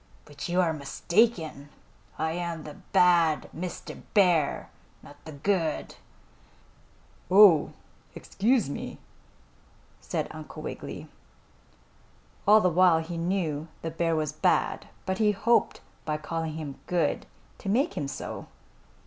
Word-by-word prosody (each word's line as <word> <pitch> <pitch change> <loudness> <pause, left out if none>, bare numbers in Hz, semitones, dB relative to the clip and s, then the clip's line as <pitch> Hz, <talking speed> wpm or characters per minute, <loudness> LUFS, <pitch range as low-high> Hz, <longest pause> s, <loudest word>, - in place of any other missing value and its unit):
"But 145 +3 -7
you 175 +1 +1
are 165 -3 +1
mistaken. 160 +1 0 0.5
I 160 +1 -1
am 170 -1 -4
the 150 - -8 0.2
Bad 175 -4 +4
Mr. 175 +2 -6
Bear, 175 -7 +3 0.3
not 145 0 -15
the 160 - -8
Good." 160 +1 -1 1.4
"Oh, 185 -5 +7 0.4
excuse 225 - +1
me," 140 - -6 1.0
said - - -3
Uncle - - -9
Wiggily. - - -7 1.4
All 215 +1 +7
the 185 - +3
while 180 -1 +5
he 170 +1 -6
knew 165 -3 -1 0.2
the 165 - -3
bear 165 0 0
was 155 -2 -1
bad, - - +1 0.2
but 190 0 -2
he 210 -1 +3
hoped 235 +4 +2 0.2
by 150 -1 -2
calling 160 +1 -4
him 150 -3 -6
good, 175 -1 0 0.3
to 195 - -5
make 265 - +1
him 145 - -2
so. 135 0 -6
165 Hz, 125 wpm, -27 LUFS, 155-190 Hz, 1.4 s, Oh